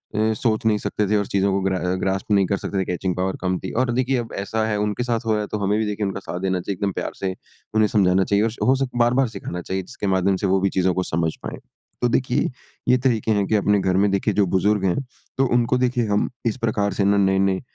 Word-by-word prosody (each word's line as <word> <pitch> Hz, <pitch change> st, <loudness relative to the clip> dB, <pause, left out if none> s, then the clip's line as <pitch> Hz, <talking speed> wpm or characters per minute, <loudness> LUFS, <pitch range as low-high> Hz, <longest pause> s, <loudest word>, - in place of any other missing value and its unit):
अ, 110 Hz, +1 st, +2 dB
सोच 110 Hz, 0 st, -1 dB
नहीं 105 Hz, -1 st, +3 dB
सकते 105 Hz, 0 st, -2 dB
थे 105 Hz, -, +3 dB
और 100 Hz, -, 0 dB
चीज़ों 100 Hz, 0 st, +1 dB
को 100 Hz, -, +1 dB
ग्रा 95 Hz, -1 st, 0 dB
अ, 90 Hz, +1 st, -1 dB
ग्रास्प 95 Hz, +2 st, -2 dB
नहीं 100 Hz, -2 st, +4 dB
कर 100 Hz, -, 0 dB
सकते 100 Hz, -, -3 dB
थे, 95 Hz, -, 0 dB
कैचिंग 90 Hz, 0 st, -2 dB
पावर 95 Hz, +1 st, -1 dB
कम 90 Hz, -1 st, 0 dB
थी। 95 Hz, -, -6 dB
और 120 Hz, -, -1 dB
देखिए 130 Hz, +1 st, +1 dB
अब 120 Hz, -1 st, -4 dB
ऐसा 110 Hz, +3 st, -1 dB
है 105 Hz, -1 st, 0 dB
उनके 105 Hz, +3 st, -1 dB
साथ 120 Hz, -1 st, -1 dB
हो 110 Hz, -, +1 dB
रहा 105 Hz, -, 0 dB
है 105 Hz, -, -4 dB
तो 105 Hz, -, -1 dB
हमें 105 Hz, +2 st, +2 dB
भी 110 Hz, -, 0 dB
देखिए 105 Hz, 0 st, -2 dB
उनका 95 Hz, 0 st, -3 dB
साथ 90 Hz, -2 st, -6 dB
देना 95 Hz, -1 st, 0 dB
चाहिए। 100 Hz, -, -3 dB
एकदम 100 Hz, -1 st, -1 dB
प्यार -, -, -3 dB
से 95 Hz, -1 st, -2 dB, 0.4 s
उन्हें 110 Hz, -1 st, +4 dB
समझाना 95 Hz, -3 st, +3 dB
चाहिए। 105 Hz, +3 st, +2 dB
स 110 Hz, -, -10 dB
और -, -, +1 dB
हो 130 Hz, -, +5 dB
सके 130 Hz, -2 st, -3 dB
बार-बार 125 Hz, +2 st, +3 dB
सिखाना 90 Hz, -5 st, -6 dB
चाहिए 95 Hz, +2 st, -3 dB
जिसके 100 Hz, -, -5 dB
माध्यम 95 Hz, +1 st, +2 dB
से -, -, +3 dB
वो 95 Hz, 0 st, +3 dB
भी 100 Hz, -, +2 dB
चीज़ों 90 Hz, 0 st, +2 dB
को 95 Hz, -, -1 dB
समझ 80 Hz, -1 st, -1 dB
पाएँ। -, -, -6 dB, 0.4 s
तो 120 Hz, -, +3 dB
देखिए 125 Hz, 0 st, +1 dB, 0.4 s
ये 125 Hz, -, +6 dB
तरीके 120 Hz, -4 st, +1 dB
हैं 100 Hz, -2 st, +2 dB
कि 110 Hz, -, +1 dB
अपने 105 Hz, 0 st, +3 dB
घर 95 Hz, 0 st, +1 dB
में 100 Hz, +1 st, +3 dB
देखिए 100 Hz, -, +1 dB
जो 100 Hz, -2 st, +3 dB
बुज़ुर्ग 105 Hz, 0 st, +1 dB
हैं 90 Hz, -, +1 dB, 0.4 s
तो 135 Hz, -, +3 dB
उनको 120 Hz, +1 st, +2 dB
देखिए 125 Hz, -2 st, +1 dB
हम 105 Hz, 0 st, +1 dB, 0.2 s
इस 115 Hz, -, 0 dB
प्रकार 110 Hz, -3 st, 0 dB
से 100 Hz, -, 0 dB
ना 100 Hz, 0 st, +3 dB
नए-नए 95 Hz, -1 st, +2 dB
100 Hz, 275 wpm, -22 LUFS, 95-110 Hz, 0.4 s, ये